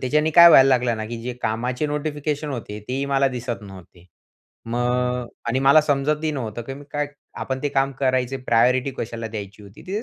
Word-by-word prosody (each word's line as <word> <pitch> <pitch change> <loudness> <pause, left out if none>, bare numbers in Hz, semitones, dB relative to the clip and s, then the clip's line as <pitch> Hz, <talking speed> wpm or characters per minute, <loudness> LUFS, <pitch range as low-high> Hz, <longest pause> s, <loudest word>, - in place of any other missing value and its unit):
त्याच्याने 150 +4 +1
काय 170 +2 +9
व्हायला 135 -5 +7
लागलं 125 -3 +2
ना, 110 - -4
की 120 - -6
जे 125 +1 -4
कामाचे 125 +6 -1
नोटिफिकेशन 150 0 -3
होते 110 -5 -6
तेही 135 +2 -2
मला 135 0 +3
दिसत 120 -3 -5
नव्हते. 95 -3 -13 0.6
मग 125 +1 -1 0.2
आणि 120 +3 +1
मला 140 +3 +6
समजतही 150 +1 0
नव्हतं, 120 -4 -5
की 135 +3 -7
मी 145 +1 -11
काय 145 0 -1 0.3
आपण 130 0 -3
ते 145 - 0
काम 135 0 0
करायचे 130 -1 +1
प्रायोरिटी 125 +3 +3
कशाला 115 0 -4
द्यायची 105 -1 -8
होती. 100 -1 -14
तिथे 200 +4 -3
130 Hz, 185 wpm, -22 LUFS, 115-145 Hz, 0.6 s, काय